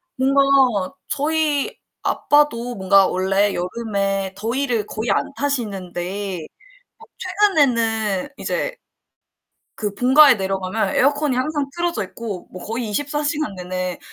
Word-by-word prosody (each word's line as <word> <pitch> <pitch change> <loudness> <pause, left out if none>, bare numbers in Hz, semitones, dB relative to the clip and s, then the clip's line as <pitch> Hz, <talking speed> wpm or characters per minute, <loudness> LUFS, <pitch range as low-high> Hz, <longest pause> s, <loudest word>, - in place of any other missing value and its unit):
뭔가 265 -6 +3
저희 300 0 0 0.3
아빠도 245 -5 +1
뭔가 195 -1 +4
원래 195 +2 +1
여름에 195 0 -2
더위를 230 +1 -1
거의 220 +2 -2
안 - - 0
타시는데 195 -7 -3 0.6
어 450 - -14
최근에는 245 - +1
이제 - - -2 1.0
그 205 -2 -3
본가에 265 +4 +7
내려가면 195 +1 -2
에어컨이 285 0 +2
항상 285 +2 -1
틀어져 340 - -1
있고 200 -1 -7
뭐 185 - -9
거의 230 +1 -3
24 290 +7 -2
시간 295 -7 -1
내내 185 0 -4
230 Hz, 240 characters per minute, -21 LUFS, 195-285 Hz, 1.0 s, 본가에